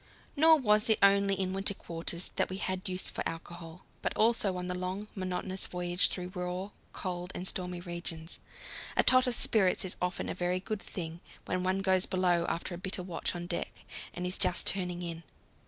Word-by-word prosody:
Nor 320 +2 +7
was 215 -5 +3
it 220 - +6
only 200 0 +5
in 185 -1 0
winter 195 +1 +2
quarters 170 +1 -1
that - - +2
we 190 - -4
had 190 0 -3
use 185 0 +1
for - - -4
alcohol, 165 +1 -9 0.2
but - - -2
also 215 -4 +3
on 180 0 -4
the 180 - -1
long, 185 +3 -4
monotonous 185 0 -2
voyage 180 0 +1
through 180 -1 -5
raw, 180 +2 -4 0.2
cold, 180 -1 -4
and 180 - 0
stormy 180 -1 0
regions. 170 -2 -4 0.6
A - - +6
tot 255 0 +5
of 245 - +1
spirits 190 -4 +3
is 185 - -4
often 180 0 -1
a - - -2
very 180 0 0
good 205 +2 -4
thing 165 -2 -6 0.3
when 185 - -1
one 190 +1 0
goes 190 -1 +3
below 180 -2 +2
after 170 +2 -3
a 175 - -6
bitter 185 0 -2
watch 175 0 -2
on 175 0 -4
deck 175 0 -2 0.4
and 180 - -5
is 180 - -2
just 175 - +4
turning 180 -2 0
in. 170 -1 -5
185 Hz, 195 wpm, -31 LUFS, 175-195 Hz, 0.6 s, Nor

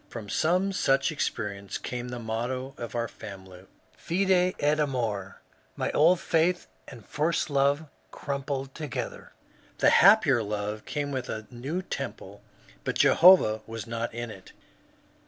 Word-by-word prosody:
From 110 -4 -8
some 180 - +1
such 135 -4 +2
experience 100 -9 -3
came 125 0 -5
the 125 - -5
motto 120 +4 -3
of 120 0 -6
our 115 0 -1
family, 95 -4 -11 0.3
Fide 185 0 +1
et 150 +1 +2
amove. 115 -9 -2 0.4
My - - -2
old 170 +4 +4
faith 175 +2 +1 0.2
and 115 -6 -12
first 155 +1 -1
love 140 +2 +2 0.2
crum 140 -1 -4
bled 135 -1 -4
together. 150 -6 -6 0.4
The - - +4
happier 175 - +6
love 105 0 -4
came 145 -1 -3
with 130 -2 -4
a 110 0 -5
new 140 +10 -4
temple, - - -6 0.4
but - - -2
Jehovah 165 - +6
was 115 -1 -6
not 115 0 -3
in 120 0 -5
it. 95 -3 -13
130 Hz, 140 wpm, -27 LUFS, 110-155 Hz, 0.4 s, happier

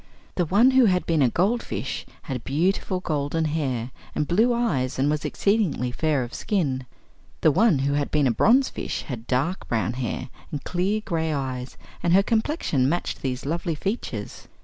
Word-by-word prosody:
The 175 - 0
one 215 +10 +5
who 260 -1 +6
had 180 -3 +2
been 165 -3 +2
a 130 - +5
goldfish 205 - -1 0.2
had 130 -6 -4
beautiful 180 +5 0
golden 155 -1 -1
hair 135 -6 -2 0.2
and 150 - 0
blue 220 +8 +3
eyes 165 - 0
and 140 +3 +2
was 150 -1 -1
exceedingly 200 - +1
fair 150 0 0
of 120 - -8
skin; 135 - -1 0.5
the 155 - +5
one 205 +1 +4
who 140 - +1
had 145 0 0
been 150 -2 +2
a 125 - +4
bronzefish 245 - +2
had 120 -4 -7
dark 140 +9 -1
brown 115 0 0
hair 125 -2 -3 0.2
and 145 -3 -5
clear 190 +4 0
gray 160 -2 -1
eyes 130 -3 -4 0.2
and 170 - +2
her 195 +2 +6
complexion 220 - +1
matched 175 +3 -2
these 130 -1 -3
lovely 170 +2 -1
features. 200 +9 -4
155 Hz, 170 wpm, -25 LUFS, 130-195 Hz, 0.5 s, who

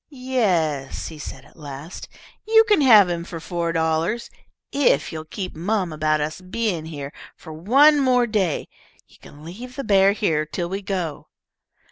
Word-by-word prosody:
"Yes," 190 - -1
he 160 -2 -11
said, 135 -2 -8
at - - -21
last, 150 +2 -9 0.4
"you 445 0 +6
can 420 -7 +3
have 220 -8 +7
him 170 -1 -3
for 170 -1 -7
four 170 0 -3
dollars, 165 +7 -1 0.4
if 280 -2 +2
you'll 155 0 -6
keep 185 +3 -6
mum 185 0 -1
about 155 0 +1
us 155 +4 -4
being 185 -3 -2
here 145 -3 -7 0.2
for 160 - -11
one 275 - +5
more 250 -3 +3
day. 200 -8 -1 0.4
You - - -22
can 145 +1 -14
leave 240 +9 -9
the 275 - -4
bear 195 -3 +4
here 165 -8 0
till 170 +3 -4
we 195 +2 -4
go." 180 -6 -4
180 Hz, 165 wpm, -22 LUFS, 160-230 Hz, 0.4 s, have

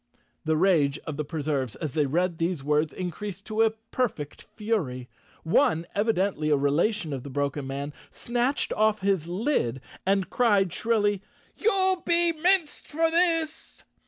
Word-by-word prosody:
The 155 0 +2
rage 155 -6 +3
of 155 - -4
the 150 - -2
Preserves, 145 -5 -2
as 155 -5 -5
they 150 -2 +1
read 175 +3 0
these 165 -3 -1
words, 150 +1 +1
increased 190 +2 -6
to 220 0 -1
a 225 - +5
perfect 220 - -4
fury. 160 - -2 0.3
One, 160 0 +2
evidently 200 -7 0
a 150 - +4
relation 155 +5 +1
of 135 - -4
the 140 - -8
broken 140 0 -2
man, 140 +2 -4 0.2
snatched 245 +4 -1
off 215 -1 +2
his 190 -5 +1
lid 180 - 0 0.2
and 195 -1 +1
cried 205 -7 +3
shrilly, 205 -4 +1 0.3
"You'll 380 -4 +2
be 340 0 +3
minced 340 0 +1
for 325 +2 +1
this!" 330 -2 0
190 Hz, 150 wpm, -26 LUFS, 150-230 Hz, 0.3 s, a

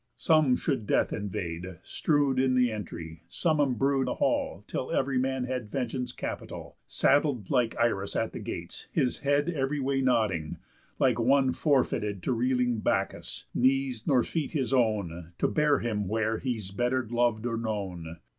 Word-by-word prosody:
Some 155 -6 +4
should 130 -9 -2
death - - +2
invade, 90 -3 -4
Strew'd 145 -4 +1
in 130 -1 +3
the 125 -2 +3
entry, 85 -7 -7
some 160 -3 0
embrue 135 0 +2
the - - -2
hall, - - 0
Till - - -4
ev'ry 135 -1 +1
man 130 0 0
had 125 -3 -3
vengeance 125 0 -2
capital, - - -6
Sattled 140 -8 +2
like 125 -4 +2
Irus 105 -4 0
at - - 0
the - - -5
gates, - - -6
his 125 - 0
head 145 +1 +1
Ev'ry 145 -3 -1
way 135 0 0
nodding, 110 -11 +1 0.4
like 125 -3 +2
one 130 +2 +3
forfeited 110 - +1
To 130 - +1
reeling 125 -1 +1
Bacchus, - - -1
knees 130 -2 +1
nor 130 -4 +4
feet 160 -2 -3
his 135 -4 0
own, 95 -9 0
To - - +2
bear 150 -1 +3
him 105 -4 -2
where 110 +2 0
he's 110 -7 -3
better 120 +3 0
lov'd 120 -1 +1
or 115 -1 -1
known." 95 -7 -4
125 Hz, 160 wpm, -28 LUFS, 105-135 Hz, 0.4 s, Some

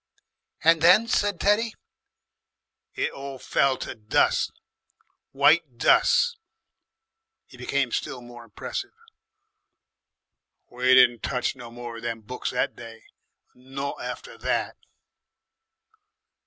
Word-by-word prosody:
"And 165 0 +5
then?" 180 +7 +6
said 205 -5 0
Teddy. 215 +3 +2 1.2
"It - - -1
all 135 -1 -8
fell 135 +1 +1
to - - -6
dus'. 110 -1 +1 0.8
White 145 -1 +3
dus'!" 475 - +4 1.1
He - - -17
became 125 +1 -1
still 125 - -3
more 120 -1 -12
impressive. 115 -3 -6 1.8
"We 125 +1 +3
didn't 120 -2 +5
touch 125 - -2
no 120 -1 -10
more 120 0 -8
of - - -9
them 115 -1 -4
books 125 +4 -5
that 125 - -1
day. 115 -1 -11 0.5
Not 135 +2 -6
after - - -7
that." - - -1
130 Hz, 105 wpm, -25 LUFS, 120-155 Hz, 1.8 s, then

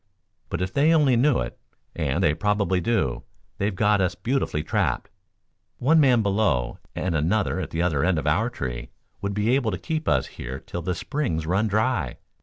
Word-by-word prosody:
But, - - -2
if 90 - -4
they 150 +3 +4
only 145 -5 +4
knew 130 +2 +3
it, - - -6 0.4
and 80 +2 0
they 75 - +4
probably 100 +1 +1
do, 90 - 0 0.4
they've 100 0 0
got 105 0 +3
us 90 0 0
beautifully 120 - -1
trapped. - - -1 0.7
One 160 +6 +4
man 125 -6 +4
below 100 - +1 0.2
and 90 - -1
another 95 +6 +1
at - - -4
the 85 +1 -1
other 80 -5 +1
end 90 0 +2
of 75 - -2
our - - +2
tree - - -5 0.3
would 100 0 -2
be 105 +4 +2
able 130 -4 +2
to 95 - -2
keep 155 - -3
us - - +2
here 65 +3 -7
till 85 - -6
the 90 +1 -2
springs 95 - -2
run 95 +6 +1
dry. 105 - 0
95 Hz, 190 wpm, -24 LUFS, 80-115 Hz, 0.7 s, they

